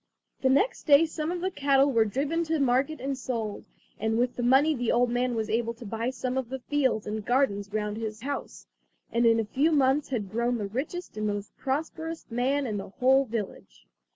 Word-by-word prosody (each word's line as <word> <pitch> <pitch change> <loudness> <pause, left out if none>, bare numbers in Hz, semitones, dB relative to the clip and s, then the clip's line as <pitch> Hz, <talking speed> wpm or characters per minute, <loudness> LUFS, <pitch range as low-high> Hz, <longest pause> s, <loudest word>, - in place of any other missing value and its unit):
The 260 - +3
next 340 - +2
day 295 +2 +7
some 315 0 -4
of 355 -1 -3
the 375 +1 -1
cattle 280 -2 +3
were 230 -3 +4
driven 285 +9 -1
to 320 -1 0
market 270 +3 +1
and 270 +2 -2
sold, 230 -5 -4 0.3
and 220 +1 0
with 245 +1 +1
the - - -3
money 265 +6 +4
the 245 -4 -1
old 245 0 +2
man 245 0 0
was 220 -1 -1
able 230 +1 -1
to 230 - -11
buy 225 +3 -2
some 255 0 -2
of 250 -3 -5
the 265 - -3
fields 260 -4 0
and 215 0 -4
gardens 205 -5 +1
round 210 0 -2
his 220 -1 -5
house, 280 +2 -5 0.5
and 235 0 +3
in 230 0 +4
a 225 - 0
few 280 +9 +1
months 280 -1 +2
had 210 -8 -3
grown 235 +2 0
the 210 - -3
richest 270 - -5
and 215 0 -1
most 205 -1 -4
prosperous 320 +4 -3
man 265 +4 +1
in 215 -4 -2
the 195 - -6
whole 265 +6 +3
village. 200 - -6
250 Hz, 210 wpm, -27 LUFS, 225-280 Hz, 0.5 s, day